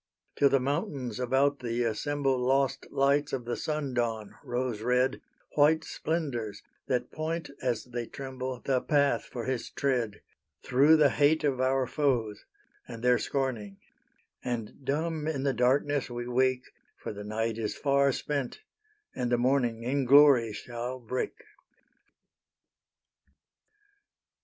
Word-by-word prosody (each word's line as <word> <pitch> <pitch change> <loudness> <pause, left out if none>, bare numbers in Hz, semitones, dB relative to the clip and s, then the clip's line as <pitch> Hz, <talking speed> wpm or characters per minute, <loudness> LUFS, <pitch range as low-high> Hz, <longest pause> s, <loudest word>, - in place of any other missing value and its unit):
Till 140 - +4
the 135 - +3
mountains 135 - -2
about 135 +3 +2
thee 120 0 -1
assemble 135 +3 0
Lost 135 +1 +1
lights 140 +1 +2
of 125 - -2
the 120 - -2
sun 150 -4 -3
dawn, 115 -3 -2
rose 120 -3 -2
red, 125 +3 +1 0.3
White 155 +2 +4
splendours, 130 -14 -3 0.2
that 125 -2 -1
point 160 0 -3
as 125 -3 -1
they 120 -1 -5
tremble 130 -2 -6
The 130 -2 +1
path 145 -2 +2
for 120 -2 -6
His 130 -2 -2
tread: 125 -6 -1 0.4
Through 145 +5 +5
the 150 -2 +5
hate 150 +2 +3
of 135 -3 +1
our 130 0 +2
foes, 120 -7 -1 0.4
and 115 -1 -9
their 125 -1 +4
scorning 120 -8 -2 0.7
And 120 +2 -4
dumb 155 +3 -1
in 140 -4 -2
the 140 -1 +1
darkness 135 +4 +1
we 120 0 -5
wake, 130 +1 0 0.2
For - - -6
the 105 0 -7
night 110 +2 -2
is 110 -2 -2
far 140 -1 +2
spent 140 - -3 0.5
and 125 -1 -2
the 120 - +4
morning 120 -2 +1
In 135 +2 0
glory 135 -4 +6
shall 120 +4 -5
break. 125 +1 -4
130 Hz, 135 wpm, -29 LUFS, 120-140 Hz, 0.7 s, glory